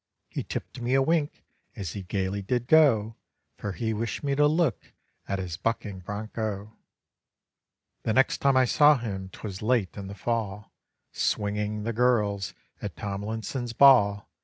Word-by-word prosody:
He - - -3
tipped 125 - -6
me 125 +2 +1
a 135 - +4
wink 155 0 0 0.3
as 95 -5 -5
he 100 - -5
gaily 95 +1 -2
did 120 +4 -1
go; 120 -8 +4 0.4
For 100 -2 -4
he 110 +2 -2
wished 115 +6 -3
me 140 -1 0
to 145 +1 +4
look 155 - 0 0.3
at 100 - -1
his 90 -3 -4
bucking 105 -4 -2
broncho. 105 +2 -5 1.3
The 110 - 0
next 130 +3 +3
time 140 -1 +3
I 130 - +5
saw 145 +4 +5
him 95 -6 -5
'twas 95 0 -7
late 110 -4 +1
in 100 -2 -6
the 100 - -7
fall, 105 -1 -3 0.4
Swinging 105 0 -1
the 115 +2 -2
girls 105 -5 +1 0.3
at - - -5
Tomlinson's 110 +4 -4
ball. 105 -7 +6
110 Hz, 155 wpm, -27 LUFS, 100-125 Hz, 1.3 s, ball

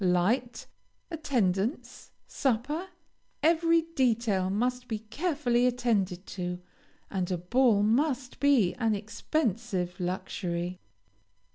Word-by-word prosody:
Light, 220 +8 +1 0.5
attendance, 235 - -1 0.2
supper, 275 +8 -1 0.6
every 330 0 +4
detail 230 - +1
must 250 +5 -1
be 220 - -2
carefully 250 +1 0
attended 210 -7 0
to, 180 -1 -4 0.5
and 185 -2 -1
a 180 - 0
ball 210 +4 +3
must 255 +3 +1
be 270 -11 +4
an 225 -3 +2
expensive 210 - -2
luxury. 180 -1 -3
230 Hz, 95 wpm, -29 LUFS, 185-260 Hz, 0.6 s, every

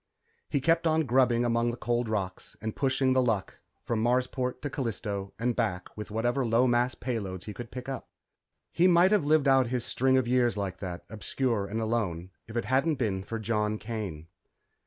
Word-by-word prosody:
He 140 - +1
kept 165 +4 +2
on 160 0 +3
grubbing 120 -1 +3
among 115 0 +2
the 120 - -4
cold 120 0 -1
rocks 95 -4 -4
and 110 0 -4
pushing 130 -1 +2
The 130 - +4
Luck 110 -6 -1 0.2
from 115 -2 -1
Marsport 125 +1 0
to 145 - -1
Callisto 105 -6 -3
and 120 +1 0
back 90 -7 -2
with 105 0 -7
whatever 120 +5 0
low 115 +1 +3
mass 120 0 +2
payloads 100 -7 -4
he 105 - -7
could 120 +2 -8
pick 125 +1 -7
up. 135 -1 -5 0.6
He 175 - +4
might 180 +2 +5
have 205 -8 +3
lived 150 -1 +3
out 135 -2 +5
his 125 -1 -2
string 130 +1 +2
of 130 -2 +1
years 120 -3 +2
like 95 -3 -3
that, 90 -3 -6
obscure 110 -1 -1
and 110 +3 -3
alone, 100 -6 -2 0.2
if 115 +2 -5
it 120 - -1
hadn't 135 +5 +2
been 105 -8 -1
for 115 +4 -5
John 110 -1 0
Kane. 105 -9 -5
120 Hz, 195 wpm, -29 LUFS, 105-130 Hz, 0.6 s, might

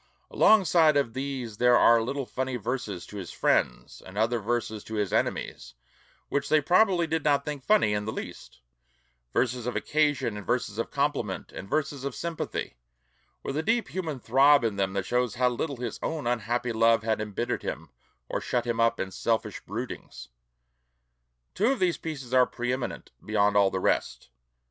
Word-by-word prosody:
Alongside 170 -7 +5
of 135 -5 0
these 130 -5 -4
there 125 +1 +5
are 115 -1 +6
little 135 +4 -3
funny 130 +1 -3
verses 115 -6 -4
to 105 - -10
his 95 -4 -6
friends, - - 0
and 95 +2 -11
other 115 +2 +1
verses 110 -1 -2
to 110 - -6
his 105 -3 -1
enemies - - -2 0.5
which 140 0 -2
they 155 - +5
probably 180 +3 +3
did 160 -1 -1
not 140 -2 +2
think 145 -3 -5
funny 210 - +3
in 105 0 -1
the 110 - -2
least; - - -8 0.7
verses 125 - 0
of 125 - -2
occasion 145 -8 0
and 105 - -7
verses 120 -3 -1
of 115 - -2
compliment; 140 -8 -2
and 95 - -9
verses 145 -3 -1
of 140 - -4
sympathy, 165 - -4 0.7
with 135 - -4
a 155 - +1
deep 230 +7 0
human 160 -7 -4
throb 135 +4 +5
in 110 -3 0
them 95 -1 -1
that 100 -1 -2
shows 125 +2 0
how 125 0 +3
little 135 +3 -3
his 120 -2 -5
own 160 -4 -3
unhappy 120 0 -1
love 115 0 +3
had 110 -1 0
embittered 105 -2 -3
him 80 -3 -6 0.4
or - - -3
shut 120 -1 -1
him 120 -1 -2
up 115 0 +2
in 95 - -3
selfish 110 0 -1
broodings. 100 - -7 1.2
Two 210 - +1
of 270 +1 +2
these 180 -4 +1
pieces 135 -6 -6
are 125 -1 +5
pre 125 +1 -2
eminent 130 0 -5
beyond 105 -1 +2
all 100 -1 +5
the 95 - -2
rest. - - -1
125 Hz, 180 wpm, -27 LUFS, 110-145 Hz, 1.2 s, are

